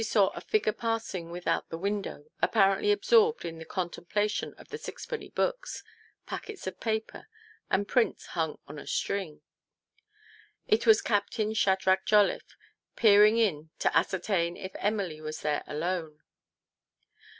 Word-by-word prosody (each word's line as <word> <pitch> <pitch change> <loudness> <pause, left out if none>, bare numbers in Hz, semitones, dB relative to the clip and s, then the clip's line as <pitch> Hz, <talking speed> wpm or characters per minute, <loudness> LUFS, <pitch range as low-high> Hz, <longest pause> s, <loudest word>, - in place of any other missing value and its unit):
109 225 - -3
saw 200 -3 +3
a - - -6
figure 430 - +1
pausing 225 -7 -3
without 175 +1 -2
the 165 - -5
window 200 -5 -3 0.2
apparently 195 - +3
absorbed 450 +2 +3
in 165 -1 -6
the 165 - -8
contemplation 195 +4 -2
of - - -15
the 445 - -5
sixpenny 465 0 -6
books, - - -2 0.4
packets 425 -3 -7
of 185 -1 -5
paper, 220 -1 -3 0.4
and 200 +1 +1
prints 245 +1 +1
hung 160 -3 -1
on 150 +1 -8
a - - -11
string. 185 -7 -2 1.3
It 225 +2 +2
was 220 -1 +6
Captain 210 +1 0
Shadrach 190 -2 +2
Jolliffe, 210 -2 +3 0.4
peering 210 0 +6
in 160 -9 +1
to - - 0
ascertain 175 -2 +1
if 190 0 -7
Ernily 195 -7 -1
was 155 0 -6
there 150 -1 0
alone. 160 -1 -3
200 Hz, 140 wpm, -29 LUFS, 170-220 Hz, 1.3 s, was